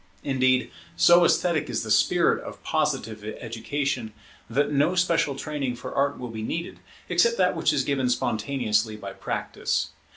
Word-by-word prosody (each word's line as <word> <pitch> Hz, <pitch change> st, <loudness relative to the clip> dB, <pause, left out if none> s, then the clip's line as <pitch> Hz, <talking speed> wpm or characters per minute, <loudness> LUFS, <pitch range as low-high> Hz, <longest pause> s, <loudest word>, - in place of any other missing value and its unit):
Indeed, 130 Hz, -2 st, +2 dB, 0.2 s
so 175 Hz, 0 st, +6 dB
esthetic 170 Hz, -2 st, +1 dB
is -, -, -1 dB
the -, -, -4 dB
spirit -, -, +3 dB
of -, -, -10 dB
Positive 110 Hz, -1 st, -1 dB, 0.2 s
education, 120 Hz, 0 st, -3 dB, 0.4 s
that 140 Hz, +5 st, +1 dB
no 150 Hz, +5 st, +2 dB
special 170 Hz, -6 st, +2 dB
training 140 Hz, -3 st, -3 dB
for 120 Hz, -, -7 dB
Art 140 Hz, +1 st, +1 dB
will 125 Hz, -2 st, -6 dB
be 110 Hz, -1 st, -6 dB
needed, 165 Hz, +10 st, -4 dB, 0.3 s
except 205 Hz, +7 st, +3 dB
that 180 Hz, -1 st, +2 dB
which 160 Hz, -1 st, +2 dB
is 140 Hz, -3 st, +1 dB
given 135 Hz, -3 st, 0 dB
spontaneously 110 Hz, -2 st, 0 dB
by 100 Hz, -2 st, -8 dB
practice. -, -, -2 dB
135 Hz, 155 wpm, -25 LUFS, 115-155 Hz, 0.4 s, so